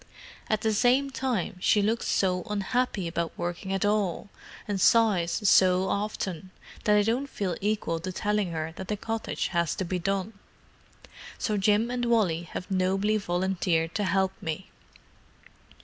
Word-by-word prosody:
At 215 -1 +1
the 220 -1 +1
same 255 +5 +3
time, 250 -10 -2
she 205 +3 +3
looks 225 +3 0
so 180 -2 +1
unhappy 210 -1 -1
about 170 0 -3
working 175 +2 -4
at 195 +1 0
all, 205 -2 0 0.4
and 200 -2 -2
sighs 205 -3 +3
so 185 0 +5
often, 195 -3 -3 0.4
that 210 0 +5
I 205 - +4
don't 240 +6 0
feel 195 -9 -3
equal 205 -5 -1
to 185 +3 -5
telling 210 0 0
her 160 0 -4
that 190 - -6
the 210 - -2
cottage 225 +2 -3
has 170 -2 0
to 190 - -3
be 180 +1 -2
done. 195 +3 -2 1.0
So 220 -4 -1
Jim 210 +4 +2
and 245 -1 -1
Wally 180 -8 +1
have 185 - -6
nobly 195 +3 +1
volunteered 175 -3 0
to 210 - -1
help 190 -1 +1
me." 165 +4 -5
195 Hz, 155 wpm, -27 LUFS, 180-215 Hz, 1.0 s, so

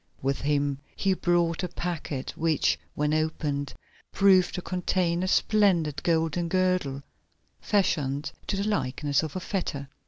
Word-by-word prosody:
With 135 +1 0
him 145 -1 0 0.2
he 195 -1 +1
brought 175 -2 +1
a 180 - -1
packet, 165 -6 -4
which, 160 -2 +1 0.2
when 150 +1 0
opened, 150 -3 -1 0.4
proved 190 -2 +4
to 180 - -3
contain 180 -1 0
a 185 - -1
splendid 185 -8 +2
golden 165 0 +1
girdle, 180 -6 0 0.6
fashioned 145 -8 0 0.2
to 195 - -1
the 200 +2 -1
likeness 145 -7 0
of 160 0 -5
a - - -1
fetter. 160 -8 -3
165 Hz, 135 wpm, -27 LUFS, 145-185 Hz, 0.6 s, proved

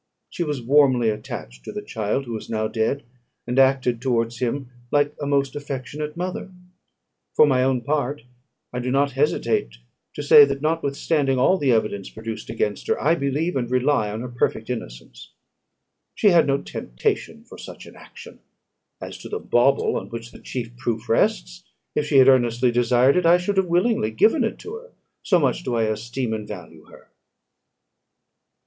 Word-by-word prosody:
She 175 - -2
was 145 -6 -3
warmly 130 -3 +4
attached 60 - -8
to - - -7
the - - -6
child 110 +5 -2
who 120 -2 -5
is 110 - -8
now 110 -1 -1
dead, 115 +5 -1 0.4
and 125 +2 0
acted 130 -3 +3
towards 120 -2 -1
him 130 +1 -2 0.2
like 145 +1 +2
a 145 - -2
most 140 -1 0
affectionate 145 +2 -5
mother. 185 +1 -4 0.8
For - - +7
my 130 -3 +2
own 130 -1 +1
part, 145 0 -2 0.5
I 125 - -2
do 125 +1 -3
not 140 +2 +2
hesitate 135 - 0 0.4
to 145 - -4
say, 145 0 +9
that, 140 -1 0
notwithstanding 145 -2 0
all 185 +9 +3
the 140 -3 +2
evidence 105 -4 0
produced 110 0 -7
against 110 -2 -2
her, - - 0
I 155 +4 +3
believe 155 +3 -1
and 120 -3 -1
rely 130 -3 +1
on 110 +2 -5
her 125 - -5
perfect 120 -1 -2
innocence. 60 - -8 0.8
She 210 - +4
had 170 -5 +4
no 140 0 0
temptation - - -3
for - - -13
such - - -10
an - - -14
action: - - -13 0.6
as - - -8
to - - -9
the - - -3
bauble 125 +3 +2
on - - -6
which 115 0 -8
the - - -13
chief 120 -2 -6
proof 120 -2 -3
rests, - - 0 0.3
if 150 - -1
she 145 - +3
had 130 -1 +7
earnestly 120 -1 +3
desired 120 +4 +3
it, 180 -2 +2
I 175 +1 +7
should 195 +3 -2
have 190 -1 +2
willingly 175 - +1
given 220 - +3
it 225 - -2
to 425 - -8
her; - - -15 0.3
so 185 - +3
much 140 -7 +1
do 125 - -3
I 115 - +1
esteem 110 +3 -2
and 105 -1 -5
value 95 -4 -10
her." - - -18
130 Hz, 180 wpm, -23 LUFS, 115-145 Hz, 0.8 s, say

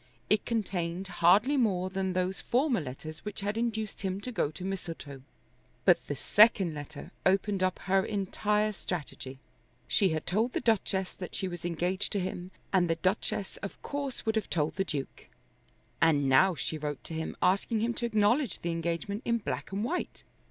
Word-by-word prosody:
It 210 -1 +4
contained 190 -5 -2
hardly 195 +10 +4
more 185 -7 +1
than 190 -1 -1
those 185 +1 -1
former 255 -1 +2
letters 155 +3 -7
which 210 -1 -5
had 205 +1 -1
induced 220 -2 -2
him 190 0 -2
to 250 - -5
go 210 - +1
to 155 +4 -7
Mistletoe. 165 -7 -5 0.6
But - - +4
the - - -2
second 205 -5 +5
letter 145 0 -8
opened 195 +1 +2
up 185 -1 +1
her 195 0 +3
entire 210 +1 0
strategy. 150 -8 -5 0.5
She 195 - +3
had 155 -1 -2
told 220 +7 +1
the - - +1
Duchess 195 -5 +1
that 180 - -7
she 190 - -1
was 175 -2 -6
engaged 175 +3 -1
to 200 - +1
him, 180 -1 -4 0.2
and 180 -3 +4
the 165 - +3
Duchess 190 +2 -1
of 200 - -7
course 280 -2 -4
would 220 0 +1
have 220 - -2
told 155 -2 0
the 195 - +1
Duke. 145 -7 -5 0.7
And 145 -4 +4
now 135 +8 +5
she 155 +3 -3
wrote 145 -2 -4
to - - -7
him 160 0 -4
asking 200 +4 +2
him 235 +1 +1
to 235 - -3
acknowledge 220 +2 +2
the 170 - 0
engagement 170 +5 -2
in 235 0 +2
black 220 - -4
and 200 +2 -1
white. 340 +10 -3
190 Hz, 180 wpm, -30 LUFS, 170-215 Hz, 0.7 s, second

